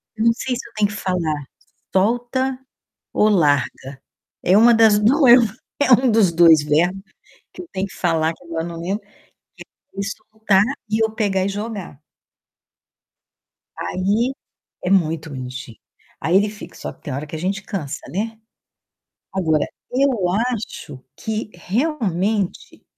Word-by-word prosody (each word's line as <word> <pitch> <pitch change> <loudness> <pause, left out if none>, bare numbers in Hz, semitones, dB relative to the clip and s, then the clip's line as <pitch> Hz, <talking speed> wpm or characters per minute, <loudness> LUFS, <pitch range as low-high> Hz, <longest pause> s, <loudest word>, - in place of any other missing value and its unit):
Não 230 +1 +3
sei 250 +2 -3
se 245 - -6
eu - - -28
tenho 210 -1 +2
que 210 - -7
falar 170 -7 -1 0.5
solta 245 +6 +1 0.5
ou 215 - +4
larga. 145 - +1 0.4
É 185 +3 +5
uma 235 +2 +7
das 220 -2 +5
não 260 +9 +3
lembro, 240 -4 +7 0.3
é 285 - +3
um 255 +1 +6
dos 215 -5 +4
2 165 -3 +6
verbos 175 +6 +1 0.5
que - - -8
eu 355 - -11
tenho 190 +1 -2
que - - -14
falar, 165 -2 +1
que 180 - -20
agora 165 -1 -3
eu - - -4
não 170 -1 -7
lembro, 195 +5 -2
que 200 - -31
é - - -27 0.8
ele 195 0 -3 0.3
soltar 215 -3 +3 0.3
e 220 +1 +1
eu 220 - 0
pegar 200 -4 0
e - - 0
jogar. 200 -7 -6 1.8
Aí 210 +8 0 0.5
É - - -1
muito 165 -4 +1
bonitinho. 130 -3 -7 0.4
Aí 170 +3 +1
ele 205 +2 +2
fica 210 0 -11
só - - -6
que - - -29
tem 145 - -5
hora 145 +3 -4
que 155 - -7
a - - -4
gente 195 +4 -2
cansa, 165 -10 -4
né. 220 +8 -3 0.9
Agora, 160 -6 +1 0.3
eu 275 +1 +4 0.4
acho 150 - -7
que 215 +7 -4
realmente 205 - -2
195 Hz, 155 wpm, -21 LUFS, 165-220 Hz, 1.8 s, uma